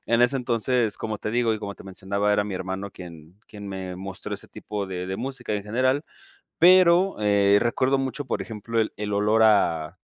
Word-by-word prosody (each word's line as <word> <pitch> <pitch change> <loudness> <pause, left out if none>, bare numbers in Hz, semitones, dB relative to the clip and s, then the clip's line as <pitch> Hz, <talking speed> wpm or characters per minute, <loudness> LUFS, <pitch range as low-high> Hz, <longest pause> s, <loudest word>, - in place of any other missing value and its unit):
en 115 +1 +2
ese 125 +3 +4
entonces 120 -2 0
como 110 -1 -3
te 105 - -4
digo, 120 -1 +1
y 110 - -5
como 100 -1 -6
te - - -14
mencionaba, 100 +1 -2
era 105 0 +1
mi 105 - -5
hermano 95 +2 -4
quien 85 +1 -12
quien 105 -1 -10
me 95 -2 -6
mostró 95 0 -6
ese - - -10
tipo 105 -1 -5
de 90 -1 -5
de 95 +1 -3
música 130 -5 -4
en 105 - -3
general. 130 +7 0 0.5
Pero, 180 +1 +6
eh, 100 -1 +4
recuerdo 130 +3 +1
mucho, 135 +1 -3
por - - -3
ejemplo, 115 +1 -3
el 110 - -2
el 105 0 -4
olor 105 +2 +3
a 85 -6 +2
105 Hz, 200 wpm, -24 LUFS, 95-120 Hz, 0.5 s, Pero